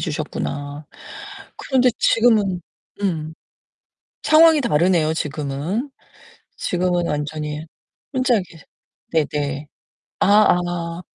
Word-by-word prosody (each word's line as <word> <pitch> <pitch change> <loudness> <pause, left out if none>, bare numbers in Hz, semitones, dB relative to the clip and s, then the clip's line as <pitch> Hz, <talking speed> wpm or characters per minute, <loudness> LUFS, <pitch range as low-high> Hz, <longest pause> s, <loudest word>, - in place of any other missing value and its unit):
주셨구나. 145 -1 -4 0.7
그런데 255 -2 +2
지금은 215 -6 +3 0.4
음. 160 -5 -2 0.9
상황이 315 -1 +6
다르네요, 170 - +2
지금은. 155 - -3 0.7
지금은 175 -1 0
완전히 150 +1 -3 0.5
혼자 255 -2 +2
계세 165 -4 -13 0.5
네 160 -2 +3
네. 145 0 -3 0.5
아 - - +3 0.4
아. 170 -1 -4
170 Hz, 190 characters per minute, -21 LUFS, 150-200 Hz, 0.9 s, 상황이